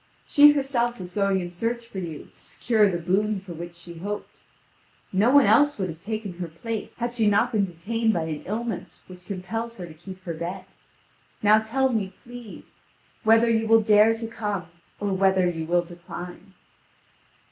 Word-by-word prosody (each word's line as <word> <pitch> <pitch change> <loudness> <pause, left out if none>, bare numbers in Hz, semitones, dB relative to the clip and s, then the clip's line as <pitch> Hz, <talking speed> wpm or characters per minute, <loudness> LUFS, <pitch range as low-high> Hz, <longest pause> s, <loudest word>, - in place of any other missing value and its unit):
She 295 0 +7
herself 245 -5 0
was 180 -1 -8
going 195 -1 +1
in 175 0 -6
search 230 +6 -3
for 215 -4 -7
you 165 -5 -6
to - - -24
secure 220 -3 +1
the 175 - -1
boon 195 +4 0
for 185 -2 -9
which 170 +1 -8
she 170 -1 -11
hoped; 205 +3 -6 0.7
no 205 +5 +4
one 285 +1 +6
else 290 +8 +4
would 190 -3 -2
have 160 -1 -8
taken 205 -2 -5
her 175 - -3
place, 215 +7 -6
had 240 0 -3
she 225 -3 +3
not 225 +4 +2
been 210 -4 +2
detained 220 +6 -1
by 170 -6 -1
an 155 -2 -4
illness 225 +3 -4
which 180 -1 -13
compels 225 +5 -4
her 180 - -6
to 165 - -11
keep 185 +3 -11
her 170 - -4
bed. 170 +3 -5 0.8
Now 215 +1 +6
tell 265 +5 +1
me, 210 -6 -1
please, 240 -3 -11 0.5
whether 225 +1 +5
you 225 -1 +2
will 225 0 +6
dare 215 +1 +5
to 225 0 -5
come, 210 -5 -3 0.3
or 205 -1 -1
whether 190 -1 +3
you 165 -2 -3
will 175 +1 +2
decline." 175 +2 -10
205 Hz, 185 wpm, -25 LUFS, 175-225 Hz, 0.8 s, She